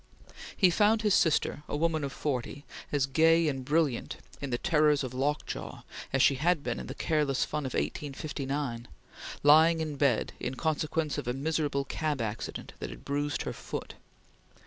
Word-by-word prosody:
He 185 -3 +5
found 215 +4 +3
his 210 -2 +3
sister, 155 -3 +2
a - - -1
woman 160 -1 +1
of 140 - -3
forty, 140 0 -3 0.3
as 145 -3 +2
gay 165 +4 +4
and 135 -3 -2
brilliant 145 -2 0 0.2
in 140 - -3
the 120 - 0
terrors 150 -3 +3
of 130 -1 -5
lockjaw 145 +3 -3 0.3
as 135 - +3
she - - +6
had 170 -2 +2
been 120 -1 -2
in - - -7
the - - -6
careless 150 -4 +1
fun 150 -3 -3
of 130 - -5
1859, 140 -4 -3 0.6
lying 160 +3 +6
in 155 -3 -3
bed 135 -5 +1
in 130 - -3
consequence 155 0 -1
of - - -6
a 125 - 0
miserable 145 0 -1
cab 150 -1 -2
accident 110 -1 -4
that 60 - -4
had 60 -1 -11
bruised 145 +1 -1
her - - -4
foot. - - -6
145 Hz, 170 wpm, -29 LUFS, 135-160 Hz, 0.6 s, she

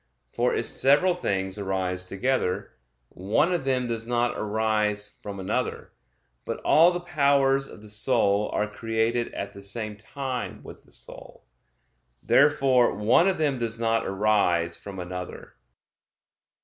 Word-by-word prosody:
For - - +1
if - - -1
several 145 +7 +4
things 95 - -2
arise 95 -2 -2
together, 95 -1 -1 0.4
one 110 - 0
of 170 -6 -2
them 130 -2 +1
does 115 -1 -4
not 120 0 0
arise 105 -1 -1
from 100 -1 -7
another. 95 - -3 0.5
But - - -4
all 165 +3 +6
the 175 0 -3
powers 140 -4 +2
of 105 - -13
the - - -11
soul 105 -2 +2
are 105 - -1
created 115 +2 -1
at 100 0 -5
the 100 - -11
same 105 +2 -4
time 130 +3 -5
with - - -12
the - - -22
soul. - - -9 0.8
Therefore 135 -3 +4
one 110 - +3
of 190 - +1
them 145 -5 0
does 115 -1 -2
not 115 0 0
arise 95 -4 +1
from 100 +1 -9
another. 90 0 -7
110 Hz, 140 wpm, -26 LUFS, 100-135 Hz, 0.8 s, all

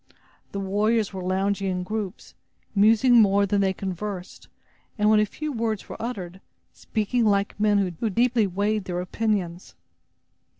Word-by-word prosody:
The 200 - -4
warriors 210 +2 0
were 190 - -5
lounging 195 +2 0
in 180 -1 -2
groups, 205 0 -5 0.4
musing 225 +4 +5
more 200 -1 +4
than 200 0 +1
they 190 -1 +2
conversed 190 0 -6 0.5
and 210 0 +3
when 215 - +5
a 210 - +2
few 305 +7 -5
words 225 -3 -2
were - - -8
uttered, 190 -6 -5 0.3
speaking 225 +2 -1
like 200 -1 +1
men 210 -1 +3 0.2
who 225 - 0
deeply 235 +1 +2
weighed 205 +2 -1
their 175 -1 -3
opinions. 185 -2 -2
205 Hz, 145 wpm, -25 LUFS, 190-220 Hz, 0.5 s, musing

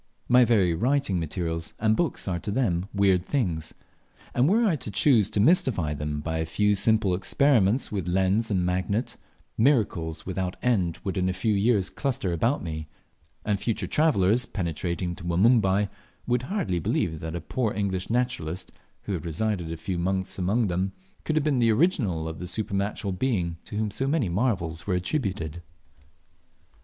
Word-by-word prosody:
My 125 0 +6
very 100 -7 +3
writing 120 0 +1
materials 80 0 -3
and 110 0 +2
books 165 -7 -1
are 90 -2 -1
to 105 - -6
them 100 -6 0
weird 95 -3 +3
things; 90 - -2 0.6
and 125 +5 +3
were 230 +4 +3
I 190 -7 +3
to 120 - -7
choose 105 -1 +3
to - - -1
mystify 105 - +3
them 75 0 -3
by 80 +1 -2
a 80 - 0
few 105 +5 +2
simple 100 -1 +2
experiments 115 +3 +2
with 95 -5 -3
lens 95 +5 +1
and 95 -4 +1
magnet, 95 +6 -1 0.4
miracles 100 - +1
without 95 -1 -3
end 95 -10 +1
would 95 0 -2
in 90 0 +1
a - - 0
few 100 +4 0
years 100 -1 +2
cluster 130 -9 -2
about 115 - 0
me; 80 -2 -5 0.6
and 105 -2 0
future 110 -4 -2
travellers, 120 - +2
penetrating 85 -1 -3
to - - -10
Wanumbai, 100 +2 +3 0.4
world 125 0 0
h - - -11
hardly 175 - -1
believe 80 0 -1
that 80 +1 -5
a - - -2
poor 110 +6 -1
English 95 -2 -2
naturalist, 115 -9 -2 0.3
who 100 - -3
had 85 -5 -3
resided 85 0 -2
a 85 - -4
few 90 +1 -3
months 95 +2 -1
among 105 +6 +1
them, 95 +1 -1 0.3
could 155 - 0
have 155 -2 +1
been 140 -4 +2
the 115 -1 +4
original 110 - +1
of 80 0 -6
the 90 - -5
supernatural 100 +1 -2
being 90 -6 -1
to 105 - -6
whom 110 -1 -1
so 135 +6 -2
many 140 - +1
marvels 85 -5 -1
were 95 - +1
attributed. 90 - -2
100 Hz, 175 wpm, -26 LUFS, 85-120 Hz, 0.6 s, My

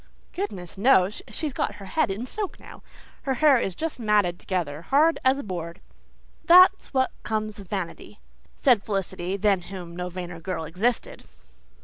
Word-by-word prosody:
"Goodness 195 - -5
knows. 205 -4 +4
She's 305 -4 -4
got - - -2
her 200 - -10
head 310 +9 0
in 205 +5 -3
soak 410 +7 -5
now. - - -13 0.4
Her 270 -2 -1
hair 275 -1 +5
is 190 -5 -2
just 325 -4 -4
matted 210 -6 +2
together 165 -6 -3
hard 300 - +3
as 260 +1 +4
a 280 - -5
board. 170 -3 -6 0.6
That's 365 +2 +6
what 260 -1 +1
comes 215 -1 -3
of 195 - -11
vanity," 190 -4 -5 0.4
said 245 -7 +4
Felicity, 195 -2 -3
than 200 -2 +2
whom 175 -3 -8
no 180 0 -4
vainer 175 -1 -7
girl 165 -1 -4
existed. 195 +10 -2
200 Hz, 160 wpm, -25 LUFS, 180-260 Hz, 0.6 s, That's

